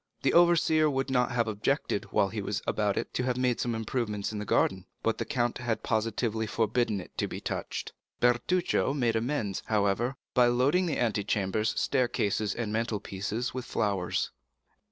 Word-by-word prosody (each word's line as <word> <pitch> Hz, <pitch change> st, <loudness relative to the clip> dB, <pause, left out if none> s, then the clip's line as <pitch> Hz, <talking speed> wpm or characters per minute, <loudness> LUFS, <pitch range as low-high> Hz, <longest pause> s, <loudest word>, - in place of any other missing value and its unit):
The -, -, +3 dB
overseer 165 Hz, -3 st, +5 dB
would 135 Hz, -1 st, -1 dB
not 125 Hz, -2 st, +2 dB
have 120 Hz, -1 st, +1 dB
objected, 105 Hz, -1 st, -1 dB
while 100 Hz, -, +1 dB
he 105 Hz, +1 st, -4 dB
was 100 Hz, +1 st, -2 dB
about 105 Hz, -2 st, 0 dB
it, -, -, -3 dB
to -, -, 0 dB
have 125 Hz, -1 st, 0 dB
made 125 Hz, -2 st, +1 dB
some 120 Hz, -2 st, -1 dB
improvements 110 Hz, -3 st, -2 dB
in 105 Hz, -, -4 dB
the 105 Hz, -, -4 dB
garden, 95 Hz, -1 st, +1 dB, 0.2 s
but 115 Hz, -, 0 dB
the -, -, -1 dB
count 120 Hz, -4 st, -1 dB
had 120 Hz, -3 st, -2 dB
positively 110 Hz, 0 st, 0 dB
forbidden 115 Hz, -1 st, +1 dB
it 90 Hz, -, -11 dB
to -, -, +1 dB
be -, -, -6 dB
touched. -, -, -4 dB, 0.3 s
Bertuccio 135 Hz, +6 st, +2 dB
made 120 Hz, -5 st, +1 dB
amends, 115 Hz, -4 st, -1 dB
however, 105 Hz, +4 st, +1 dB, 0.2 s
by 125 Hz, -2 st, +5 dB
loading 140 Hz, +10 st, +3 dB
the 155 Hz, -, -1 dB
antechambers, 105 Hz, -2 st, 0 dB
staircases, 120 Hz, -5 st, 0 dB
and 115 Hz, -3 st, -3 dB
mantle 115 Hz, -1 st, -1 dB
pieces 105 Hz, +5 st, -3 dB
with 130 Hz, -1 st, -4 dB
flowers. 100 Hz, -6 st, -1 dB
115 Hz, 175 wpm, -29 LUFS, 105-125 Hz, 0.3 s, overseer